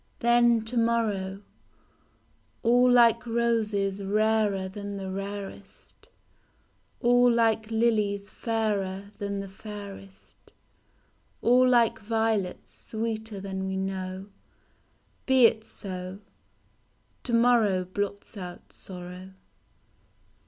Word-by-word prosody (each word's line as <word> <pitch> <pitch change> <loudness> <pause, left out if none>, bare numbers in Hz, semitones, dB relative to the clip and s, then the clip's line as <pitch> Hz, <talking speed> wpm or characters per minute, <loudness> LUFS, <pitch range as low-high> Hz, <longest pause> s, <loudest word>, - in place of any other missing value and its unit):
Then 235 -1 +4
to 240 +2 -3
morrow: 210 -4 0 0.6
— - - -39
All 245 +2 +5
like 235 -2 +5
roses 220 -4 0
rarer 210 -1 +1
than 200 +1 -6
the 190 -1 -5
rarest, 195 0 -8 0.9
All 245 0 +5
like 225 -2 +2
lilies 215 -3 +1
fairer 200 -4 -2
than 200 -1 -3
the 195 - -7
fairest, 195 -1 -11 0.9
All 250 +2 +5
like 240 -2 +3
violets 220 -3 -1
sweeter 220 -2 -4
than 190 0 -4
we 190 0 -2
know; 190 0 -4 1.0
Be 260 -2 +6
it 220 -1 +3
so, 185 -3 -6 1.0
To 245 - -5
morrow 230 -6 +4
blots 200 +3 -4
out 180 -3 -9
sorrow. 180 0 -10
205 Hz, 95 wpm, -27 LUFS, 195-230 Hz, 1.0 s, Be